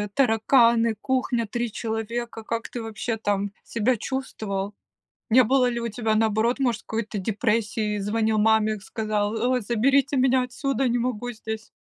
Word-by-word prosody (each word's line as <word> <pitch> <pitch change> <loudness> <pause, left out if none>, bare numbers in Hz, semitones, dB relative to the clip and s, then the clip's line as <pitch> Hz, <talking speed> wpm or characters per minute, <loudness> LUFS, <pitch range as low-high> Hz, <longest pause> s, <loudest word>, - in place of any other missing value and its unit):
тараканы, 230 -2 +4
кухня, 255 -3 0
3 240 +1 -3
человека. 225 +1 -4
Как 230 +1 -3
ты 240 - -5
вообще 225 +1 -3
там 205 -1 -1
себя 235 +2 0
чувствовал? 210 -6 -4 0.6
Не 250 +2 +6
было 255 +2 +3
ли 235 -1 -2
у 235 - -2
тебя, 220 0 -1
наоборот, 220 +3 +2
может, 245 -5 0
какой-то 220 -2 -4
депрессии? 210 0 0
Звонил 215 +2 0
маме, 215 -1 +3
сказал: 215 0 -2 0.2
"О, 250 - +1
заберите 270 +6 +2
меня 255 0 +3
отсюда, 265 +1 -1
не 240 +1 +1
могу 245 0 -2
здесь." 220 0 -6
225 Hz, 145 wpm, -25 LUFS, 215-245 Hz, 0.6 s, Не